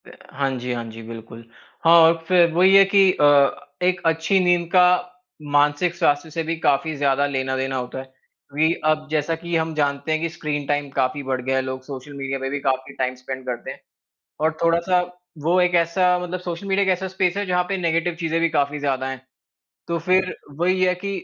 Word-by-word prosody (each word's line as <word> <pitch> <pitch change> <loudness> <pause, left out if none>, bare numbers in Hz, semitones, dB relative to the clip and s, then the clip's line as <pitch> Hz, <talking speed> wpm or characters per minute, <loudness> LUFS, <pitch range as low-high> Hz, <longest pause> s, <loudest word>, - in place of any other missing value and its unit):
हाँ 140 +1 -5
जी, 125 +1 -4
हाँ 120 -1 -4
जी, 115 +1 -10
बिल्कुल। 115 +1 -10 0.4
हाँ, 165 +1 +7
और 165 0 +4
फिर 175 -2 +4
वही 185 +3 +5
है 195 - +9
कि 195 -2 +6
अ, 150 - +1 0.6
एक 185 +1 +1
अच्छी 165 +4 +2
नींद 175 -1 +2
का 180 -1 +6 0.7
मानसिक 145 +4 +2
स्वास्थ्य 160 -2 +1
से 165 +1 -3
भी 165 +1 -2
काफ़ी 155 +1 +1
ज़्यादा 140 0 +1
लेना 130 -1 -2
देना 135 0 -2
होता 125 0 -4
है। 130 - -8 0.5
अभी 155 +3 +2
अब 155 0 +1
जैसा 155 +1 0
कि 170 0 -3
हम 160 0 0
जानते 140 0 -1
हैं 155 0 0
कि 165 - -1
स्क्रीन 150 -3 -4
टाइम 145 -1 -1
काफ़ी 135 +2 0
बढ़ 130 -1 -2
गया 130 +1 -1
है, 130 - +2
लोग 130 0 -5
सोशल 135 +1 -9
मीडिया 135 -1 -4
पे 135 0 -3
भी 145 +1 -3
काफ़ी 135 0 -2
टाइम 130 0 -2
स्पेंड 130 0 -8
करते 120 -2 -5
हैं। - - -11 0.6
और 160 +1 +2
थोड़ा-सा 170 +2 +2 0.4
वो 175 +4 +3
एक 180 0 +2
ऐसा 180 +2 +2
मतलब 180 +1 -5
सोशल 175 +2 -6
मीडिया 195 +1 +2
एक 190 - 0
ऐसा 185 +1 -4
स्पेस 185 0 -1
है 205 - -1
जहाँ 180 -1 +1
पे 195 - -1
नेगेटिव 170 -1 0
चीज़े 165 -1 -1
भी 170 0 +2
काफ़ी 145 -1 0
ज़्यादा 135 -2 -1
हैं। 130 -2 -6 0.7
तो 170 0 -1
फिर 185 0 +2 0.2
वही 185 +2 +1
है 180 0 +3
कि 200 +2 -6
160 Hz, 210 wpm, -22 LUFS, 135-175 Hz, 0.7 s, है